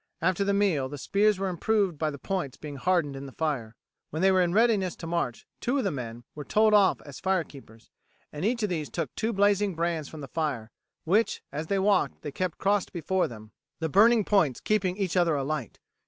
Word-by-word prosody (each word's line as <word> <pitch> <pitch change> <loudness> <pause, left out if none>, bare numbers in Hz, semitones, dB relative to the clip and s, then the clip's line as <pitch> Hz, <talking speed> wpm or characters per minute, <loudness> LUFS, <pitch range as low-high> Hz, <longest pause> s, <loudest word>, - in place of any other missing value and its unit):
After 185 +3 +1
the 200 - +1
meal 190 -10 +1
the 145 - -6
spears 205 +7 +2
were 195 0 -1
improved 190 -2 0
by 155 - +1
the 145 - -6
points 175 -4 -3
being 145 -2 -8
hardened 165 -2 +1
in 135 +1 -7
the - - -10
fire. 130 -8 -3 0.3
When 155 +4 -3
they 190 - +6
were 185 -1 +4
in 175 -1 +2
readiness 210 -3 +2
to - - -9
march 165 -8 -2
two 250 +4 0
of 270 - 0
the 195 - 0
men 120 -4 -6
were 150 - -7
told 215 +6 +3
off 200 -2 +4
as 145 -2 -10
fire 190 -2 +1
keepers, 115 -7 -16 0.4
and 150 +2 -5
each 230 +2 0
of 210 - +1
these 160 -5 -3
took 160 -7 -4
two 225 - -1
blazing 200 -2 +2
brands 165 -2 -1
from 155 - -9
the 140 - -7
fire, 130 -7 -3 0.3
which, 205 +7 +1
as 150 +3 -4
they 200 - +1
walked, 195 0 +1
they 145 - -4
kept 180 +3 -3
crossed 200 0 +1
before 180 +2 0
them, 110 -2 -11 0.3
the 160 -1 -2
burning 220 +5 +5
points 170 - +2
keeping 190 -3 0
each 195 -4 -1
other 170 -4 +3
alight. 140 -3 -3
175 Hz, 220 wpm, -27 LUFS, 145-200 Hz, 0.4 s, they